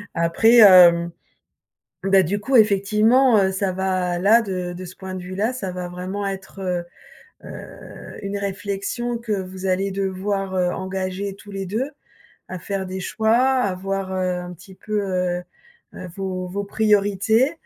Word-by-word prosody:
Après, 225 +8 +5 0.3
heu, 170 0 -4 0.9
bah 195 0 +4
du 205 +5 -2
coup, 260 +5 -1
effectivement, 215 +4 +4
heu, 190 -1 +2
ça 190 0 -1
va 185 -2 -1
là, 220 +5 +5
de 180 -3 -4
de 185 +1 -8
ce 185 - -11
point 190 -1 -7
de 180 - -6
vue-là, 200 +7 -2
ça 195 -7 -4
va 180 0 -5
vraiment 185 +3 -4
être, 190 -2 -4 0.6
heu, - - -11
une 200 0 -4
réflexion 200 +5 -3
que 230 -2 -4
vous 190 -1 -5
allez 190 +1 0
devoir, 195 0 -2
heu, 180 -1 +1
engager 190 +1 -4
tous 205 0 -14
les 195 -1 -4
2 225 +9 -2 0.6
à 185 - -6
faire 195 +1 -4
des 185 +1 -5
choix, 220 +4 +1
à 255 -7 +2
voir, 195 0 -3
heu, 185 -1 -1
un 180 0 -8
petit 190 +3 -14
peu, 210 +2 -3
heu, 180 -2 -1 0.7
vos 185 -2 -4
vos 200 +2 -4
priorités. 210 - +2
195 Hz, 155 wpm, -22 LUFS, 185-205 Hz, 0.9 s, Après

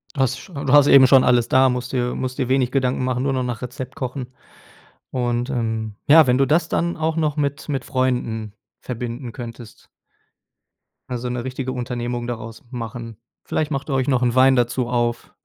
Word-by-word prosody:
Du 140 - -3
hast 130 -3 +1
scho 190 - -13
du 140 -3 -2
hast 145 -1 +7
eben 135 -1 +8
schon 130 0 +6
alles, 120 -2 +3
da 130 0 +5
musst 125 0 -4
dir 125 -1 -1
musst 130 0 -4
dir 130 - -1
wenig 130 -2 +2
Gedanken 130 -1 0
machen, 125 -1 -1
nur 135 0 0
noch 130 -1 0
nach 125 -1 -4
Rezept 125 +1 -6
kochen 130 -3 -4 0.8
und, 120 0 -1
ähm, 110 -4 -2
ja, 155 0 +7
wenn 125 0 +3
du 135 - +3
das 160 +4 +1
dann 170 +1 -1
auch 160 0 -1
noch 155 -3 0
mit 145 -1 -2
mit 135 -4 -2
Freunden 125 -5 -1 0.3
verbinden 120 0 -5
könntest 115 -1 -10 1.2
also, 125 0 -3
'ne 120 -1 -3
richtige 130 0 -4
Unternehmung 120 -1 -3
daraus 115 -2 -6
machen. 115 -2 -6 0.3
Vielleicht 155 -1 -2
macht 140 0 -3
ihr - - 0
euch 130 0 0
noch 130 -3 +2
'n 120 -1 +2
Wein 130 +1 +5
dazu 120 0 0
auf, 120 -1 -2
125 Hz, 195 wpm, -21 LUFS, 120-135 Hz, 1.2 s, eben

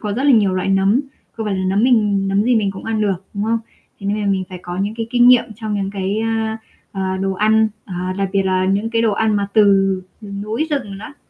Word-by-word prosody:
có 210 -1 -3
rất 245 - -2
là 290 - +5
nhiều 205 -5 +4
loại 185 +1 -1
nấm, 195 +5 +3 0.3
không 220 -1 -5
phải 200 - -1
là 185 - -2
nấm 195 +3 +1
mình 205 -6 +2
nấm 195 +1 +2
gì 245 0 +3
mình 200 -3 +1
cũng 190 - -9
ăn 220 -1 -1
được, 195 -3 -1
đúng 200 - -2
không? 230 +1 +1 0.4
Thế 195 - -6
nên 210 +1 0
là 205 - -2
mình 195 -1 0
phải 185 - -8
có 175 0 -6
những 200 +3 -2
cái 225 -1 -4
kinh 245 0 +5
nghiệm 250 -1 +6
trong 220 -2 -4
những 195 -1 -2
cái, 200 +1 -2
a, 225 0 -1 0.3
à, 190 -1 -2
đồ 195 0 0
ăn, 215 +3 +3 0.2
à, 185 0 -4
đặc 195 -1 0
biệt 195 -1 +2
là 185 -1 +1
những 200 +4 0
cái 230 -1 +1
đồ 220 -2 +2
ăn 215 0 +1
mà 200 -1 0
từ 215 - +6 0.6
rừng 200 -1 -7
núi 225 +9 -2
rừng 210 -9 -3
đó. 220 +7 -10
205 Hz, 265 wpm, -19 LUFS, 195-220 Hz, 0.6 s, nghiệm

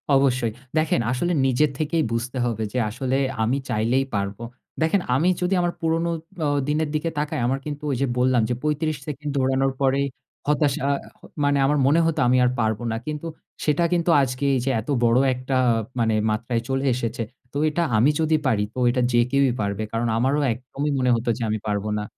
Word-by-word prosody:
অবশ্যই। 130 -4 +2 0.3
দেখেন 155 -6 +2
আসলে 130 +8 0
নিজের 135 +3 +3
থেকেই 160 +1 +1
বুঝতে 120 +3 -2
হবে 115 -2 -2
যে - - -1
আসলে 130 +4 -1 0.3
আমি 120 +5 +1
চাইলেই 120 +3 +1
পারব। 100 0 -2 0.4
দেখেন 165 +5 +2
আমি 160 +7 +3
যদি 180 +2 +1
আমার 175 0 0
পুরনো 165 +1 0 0.4
অ - - +2 0.2
দিনের 150 +1 0
দিকে 155 +2 0
তাকাই, 150 0 -2
আমার 135 +2 0
কিন্তু 150 0 -6
ওই - - 0
যে 140 - +2
বললাম 125 -1 +3
যে - - +1
৩৫ 150 0 0
সেকেন্ড 150 0 -4
দৌড়ানোর 135 0 +1
পরেই 135 +1 +2 0.4
হতাশা 150 -2 +1
আ - - +3 0.5
মানে 145 0 +3
আমার 145 +2 +2
মনে 150 +4 +4
হত, 165 -1 0
আমি 125 +1 +4
আর 125 - +2
পারব 110 -2 +1
না। - - -1
কিন্তু 150 +2 -4 0.4
সেটা 150 +3 +2
কিন্তু 175 0 +1
আজকে 130 +1 -1
এইযে 130 +1 0
এতবড় 120 -1 +1 0.2
একটা 130 +1 -3 0.4
মানে 115 -1 +2 0.2
মাত্রায় 115 +2 -1
চলে 135 +1 0
এসেছে। 115 -1 -2 0.3
তো - - -5
এটা 155 +3 -1 0.2
আমি 120 +7 +5
যদি 160 0 +2
পারি, 110 -5 +2
তো - - -5
এটা 125 +1 +1
যে 120 - +4
কেউই 140 -2 +3
পারবে। 100 +1 -2
কারণ 115 +1 -1
আমারও 135 +5 +2
একদমই 135 +5 -4
মনে 125 -1 +2
হত 115 +1 -3
যে - - -8
আমি 110 0 -1
পারব 105 -1 -1
না। 105 - -2
135 Hz, 190 wpm, -23 LUFS, 120-150 Hz, 0.5 s, আমি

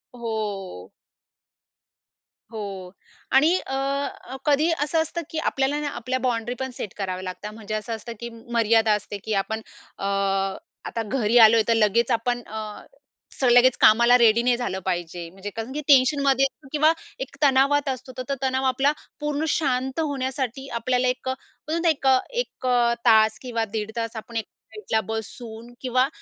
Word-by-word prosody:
हो. 205 - -5 1.6
हो. 195 -4 -6 0.4
आणि 305 +7 +5
अ, 275 -1 -3
कधी 300 +2 +3
असं 320 +2 +1
असतं, 330 +2 -3
की 320 - -6
आपल्याला 280 0 0
ना 300 - -2
आपल्या 255 +2 -2
बाउंडरी 245 -1 -1
पण 265 -1 -3
सेट 200 - -5
कराव्या 185 -2 -3
लागतात. 190 +3 -6
म्हणजे 215 -1 -7
असं 215 +2 -3
असतं, 230 +2 -8
की 235 - -5
मर्यादा 230 -1 +2
असते 210 0 -3
की 220 - -2
आपण 220 +2 -4 0.4
अ, - - -8 0.8
आता 230 - -3
घरी 235 -1 +1
आलोय, 225 -1 +8
तर 230 - +4
लगेच 225 +2 +2
आपण 240 +1 0
अ, 215 -1 -7 0.5
स - - -4
लगेच 245 +1 +6
कामाला 235 +3 +7
रेडी 235 -1 +5
नाही 245 -1 +3
झालं 240 -6 -3
पाहिजे. 175 -2 -3
म्हणजे 195 +3 -8
कारण 225 +4 -6
की 300 - -3
टेन्शनमध्ये 275 -1 +4
असतो 270 +2 -7
किंवा 310 +1 +4 0.3
एक 265 +2 -6
तणावात 280 +1 +4
असतो. 260 0 -5
तर 255 - -3
तो 275 - +1
तणाव 260 0 0
आपला 270 +2 +3 0.3
पूर्ण 295 +1 -1
शांत 265 -2 0
होण्यासाठी 265 -3 -2
आपल्याला 250 +1 +1
1 250 +1 -2
अ, - - +2
आपण 275 +3 -9
बोलतो 335 - 0
ना 335 - +3
1 275 -3 0
अ, 260 -1 +6
1 485 - -4
अ, 240 -1 +3
तास 220 -1 +5
किंवा 235 -3 -2
दीड 215 0 -2
तास 230 0 -3
आपण 230 +2 -8
एक 225 - -2 0.3
साईडला 425 - -1
बसून 225 +2 -7
किंवा 255 0 +2
245 Hz, 170 wpm, -24 LUFS, 220-270 Hz, 1.6 s, आलोय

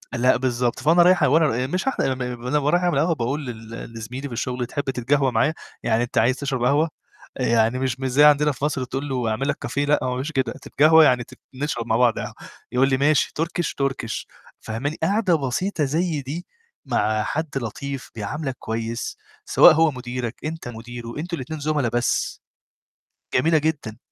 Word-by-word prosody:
لأ، 125 +1 +3
بالضبط 125 -1 -1
فأنا 165 +3 +4
رايح 180 -3 +5
وأنا 155 +3 +4 0.2
ب - - -10
مش 185 +1 0
رايح 270 - 0
أعمل 125 -2 -1
ما 125 +1 -6
أنا 150 - +2
ورايح 160 +5 +2
أعمل 175 -6 +2
قهوة 165 +1 +2
باقول 140 +3 -2
لل 115 0 -8
لزميلي 125 +5 -6
في 125 - -8
الشُغل 125 +1 -2
"تحب 145 +4 -3
تتقهوى 135 +1 +1
معايا؟" 145 +8 +2 0.3
يعني 115 0 +2
أنت 120 - -5
عايز 125 +3 +3
تشرب 135 -4 -2
قهوة، 145 +6 +3 0.5
آآ - - -2
يعني 115 +2 +2
مش 130 -1 -1
مش 130 - -1
زي 145 +4 +4
عندنا 150 0 +5
في 135 +1 -3
مصر 145 -3 -1
تقول 135 +3 -4
له 125 -3 -1
أعمل 135 +5 -1
لك 145 - -2
cafe - - -8
لأ، 145 +1 +3
هو - - -1
ما - - 0
بيقولش 130 +5 -3
كده 135 -3 0
تتقهوة 160 +2 +5
يعني 125 -2 +3
تت - - -16 0.2
نشرب 130 -4 -3
مع 110 - +2
بعض 120 -2 +3
قهوة، - - -5 0.4
يقول 130 +2 +3
لي 135 - +2
ماشي 145 +1 +2
Turkish 170 +1 -1 0.2
Turkish 135 -4 -2 0.4
فاهماني؟ 140 +8 -3
قاعدة 195 -1 +2
بسيطة 150 +6 -1
زي 160 +1 0
دي 150 +7 -6 0.4
مع 110 0 +1
حد 160 +1 -2
لطيف، 135 +3 -5
بيعاملك 130 +6 -4
كويس، 115 +1 -4 0.3
سواء - - +7
هو 160 -1 +4
مديرك، 125 -2 -5
أنت 160 -3 -5
مديره، 120 +1 -8
أنتم 170 +1 -4
الاتنين 150 +4 -6
زملاء 145 -5 0
بس، 120 0 0 0.9
جميلة 160 +6 +4
جدًا، 145 -8 -2
135 Hz, 195 wpm, -23 LUFS, 120-150 Hz, 0.9 s, سواء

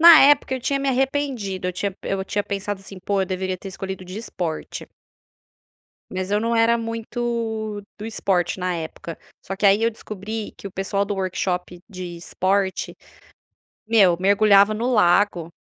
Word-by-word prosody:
Na 335 -1 +11
época 280 -1 +5
eu 260 - -4
tinha 275 +3 0
me 275 0 -1
arrependido, 260 -8 -1
eu - - -2
tinha 200 +2 -2
pe - - -10
eu 190 -1 -1
tinha 205 +1 -1
pensado 200 0 -3
assim: 195 -1 -10
"Pô, 200 -1 +1
eu 190 - -2
deveria 185 0 -2
ter 195 - -8
escolhido 190 -1 -6
de 185 +4 -7
esporte." 175 -8 -5 1.2
Mas 185 +1 -4
eu 210 - +3
não 230 +1 0
era 230 +1 +4
muito 230 -2 -3 0.2
do 215 - -5
esporte 190 -5 0
na 180 0 0
época. 165 0 -6 0.3
Só 195 - -4
que, 205 - 0
aí, 200 +3 +5
eu 230 - +3
descobri 215 0 -6
que 200 - -7
o - - -12
pessoal 195 +1 -1
do 205 +1 -2
workshop 180 -2 -2
de 180 -3 -6
esporte, 190 +3 -1 0.9
meu, 200 -6 +5
mergulhava 200 +1 +5
no 240 +4 0
lago. 175 -4 +3
200 Hz, 170 wpm, -23 LUFS, 185-225 Hz, 1.2 s, Na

